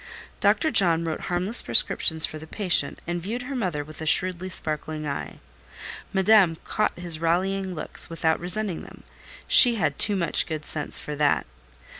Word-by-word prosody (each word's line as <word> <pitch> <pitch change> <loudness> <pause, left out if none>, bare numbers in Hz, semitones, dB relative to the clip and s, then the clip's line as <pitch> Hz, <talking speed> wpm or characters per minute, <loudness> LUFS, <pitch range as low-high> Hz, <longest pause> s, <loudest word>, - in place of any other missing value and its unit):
Dr. 315 - +1
John 170 -7 +3
wrote 160 -1 -4
harmless 180 +6 +1
prescriptions 160 -1 +2
for 155 - -9
the 160 - -12
patient, 190 -1 0
and 175 0 -4
viewed 230 +7 -5
her 270 +2 -7
mother 180 - -3
with 155 +2 -12
a 160 - -5
shrewdly 185 +3 +1
sparkling 155 -2 +2
eye. 140 - -6 0.7
Madame 190 -3 +3
caught 215 - -2
his 175 -3 -3
rallying 185 +3 -2
looks 155 - -3
without 165 -1 -1
resenting 185 0 -4
them—she 245 -2 +1
had 155 -9 -2
too 205 - +5
much 170 -5 +2
good 155 -2 -6
sense 150 -2 0
for 150 - -6
that. 145 -1 +1
175 Hz, 160 wpm, -24 LUFS, 160-195 Hz, 0.7 s, too